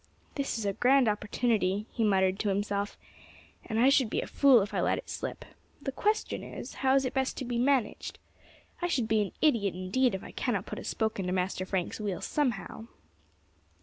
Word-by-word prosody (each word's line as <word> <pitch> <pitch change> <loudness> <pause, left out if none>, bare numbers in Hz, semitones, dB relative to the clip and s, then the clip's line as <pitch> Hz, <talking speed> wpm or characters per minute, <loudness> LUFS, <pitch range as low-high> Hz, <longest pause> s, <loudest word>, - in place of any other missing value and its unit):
"This 275 -4 -2
is 220 - -3
a 200 - 0
grand 255 +3 +4
opportunity," 210 -1 0
he 230 - -1
muttered 190 -2 +2
to 210 - 0
himself, 200 +1 -1 0.7
"and 220 -1 -2
I 255 +3 +6
should 270 -4 +4
be - - -1
a - - -2
fool 265 -7 +5
if 205 - -7
I - - +1
let - - +2
it - - -7
slip. - - -5 0.3
The 275 - -4
question 425 +10 -1
is, - - -8
how 265 0 +4
is 270 -1 +3
it 255 - -2
best 265 -1 -1
to 260 - -4
be 240 -1 -2
managed. 255 -3 0 0.6
I 350 - +1
should 255 -10 0
be 220 -1 +3
an 200 - -2
idiot 220 - +3
indeed 190 +6 +1
if 190 - -6
I - - -9
cannot 205 -6 -1
put - - -6
a - - -8
spoke 220 -2 -1
into 180 -1 -2
Master 185 0 -1
Frank's 185 +1 -2
wheel 200 -5 -2
somehow." 235 -5 -2
220 Hz, 205 wpm, -29 LUFS, 200-260 Hz, 0.7 s, I